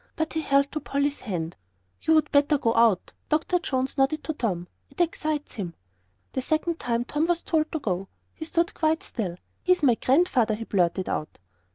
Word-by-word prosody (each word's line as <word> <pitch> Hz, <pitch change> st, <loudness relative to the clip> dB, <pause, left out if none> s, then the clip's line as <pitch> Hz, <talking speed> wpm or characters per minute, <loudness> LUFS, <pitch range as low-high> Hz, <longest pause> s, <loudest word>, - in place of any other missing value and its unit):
But 320 Hz, -1 st, -2 dB
he 320 Hz, -, 0 dB
held 280 Hz, -1 st, +2 dB
to 305 Hz, -, -2 dB
Polly's 285 Hz, 0 st, -1 dB
hand. 175 Hz, -7 st, -4 dB, 0.5 s
"You 320 Hz, -, +4 dB
would 310 Hz, -, +3 dB
better 290 Hz, +1 st, +4 dB
go 230 Hz, -4 st, +1 dB
out," 230 Hz, -6 st, +3 dB, 0.2 s
Dr. 315 Hz, +4 st, +2 dB
Jones 265 Hz, -4 st, -2 dB
nodded 280 Hz, +3 st, +2 dB
to 315 Hz, -, -2 dB
Tom. 185 Hz, -, -2 dB, 0.2 s
"It 275 Hz, -, -17 dB
excites 310 Hz, -3 st, -1 dB
him." 180 Hz, -7 st, -5 dB, 0.6 s
The 260 Hz, -, -1 dB
second 315 Hz, +4 st, 0 dB
time 235 Hz, 0 st, -1 dB
Tom 300 Hz, +5 st, 0 dB
was 345 Hz, -1 st, 0 dB
told 310 Hz, -2 st, +1 dB
to -, -, -1 dB
go. 190 Hz, -6 st, -2 dB, 0.3 s
He 315 Hz, -, -7 dB
stood 335 Hz, +1 st, +1 dB
quite 320 Hz, 0 st, +1 dB
still. 185 Hz, -7 st, -4 dB, 0.2 s
"He's 365 Hz, -3 st, +2 dB
my 255 Hz, -4 st, +6 dB
Grandfather!" 255 Hz, -4 st, +3 dB
he 225 Hz, -, -6 dB
blurted 185 Hz, -3 st, +1 dB
out. 155 Hz, -, -3 dB
280 Hz, 190 wpm, -26 LUFS, 225-315 Hz, 0.6 s, my